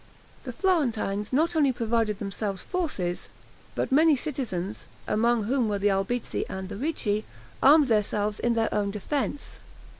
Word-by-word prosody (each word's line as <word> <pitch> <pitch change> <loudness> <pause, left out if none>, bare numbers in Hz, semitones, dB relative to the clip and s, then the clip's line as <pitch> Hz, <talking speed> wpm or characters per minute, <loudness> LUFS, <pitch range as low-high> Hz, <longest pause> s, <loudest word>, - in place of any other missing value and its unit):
The - - -4
Florentines 230 - 0
not 320 +6 +2
only 290 -4 +4
provided 230 -3 0
themselves 195 -1 -4
forces, 205 - -3 0.5
but - - -1
many 310 +2 +5
citizens, 240 - -4 0.2
among 235 +1 +2
whom 240 +1 +1
were 205 - 0
the 200 +1 +2
Albizzi 195 +5 -1
and 190 0 -5
the 205 - -6
Ricci, 215 -5 -1 0.4
armed 295 +1 +7
themselves 210 -2 +1
in 240 -1 +1
their 225 -1 0
own 205 -1 0
defense. 275 +7 -3
225 Hz, 145 wpm, -27 LUFS, 205-275 Hz, 0.5 s, armed